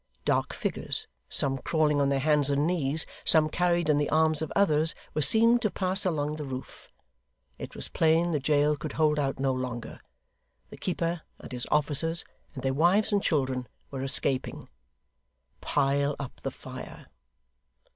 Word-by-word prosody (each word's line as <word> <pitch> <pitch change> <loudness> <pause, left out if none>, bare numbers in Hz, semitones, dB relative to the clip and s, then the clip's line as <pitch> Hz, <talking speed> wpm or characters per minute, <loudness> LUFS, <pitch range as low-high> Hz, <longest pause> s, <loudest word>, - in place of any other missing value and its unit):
Dark - - 0
figures, - - -2 0.2
some 135 -1 +1
crawling 150 0 +1
on 140 - +2
their 140 - +1
hands 145 0 +3
and 140 +1 +1
knees, 160 -3 0 0.2
some 155 -1 +4
carried 175 -1 0
in 150 -2 +3
the 145 - 0
arms 155 -1 +2
of 160 - -4
others, 160 -5 +2 0.2
were 155 - -1
seen 230 - +6
to 215 - 0
pass 190 0 -1
along 150 -3 -2
the 150 - -5
roof. 130 -2 -8 0.7
It - - -8
was - - -5
plain 165 +2 +2
the 150 - 0
jail 145 +1 +2
could 145 - -7
hold 150 -1 +1
out 135 -2 -1
no 135 -1 +1
longer. 125 -2 -5 0.7
The - - -10
keeper, 170 -2 -2 0.2
and - - -12
his 125 -1 -4
officers, 150 +3 +1 0.3
and 130 - -7
their 135 0 0
wives 180 +9 +2
and 200 - +2
children, 130 -7 -1 0.2
were 135 -2 -5
escaping. 135 0 +2 0.9
Pile 140 0 0
up 140 -3 -8
the - - -3
fire! - - -10
150 Hz, 165 wpm, -27 LUFS, 140-165 Hz, 0.9 s, seen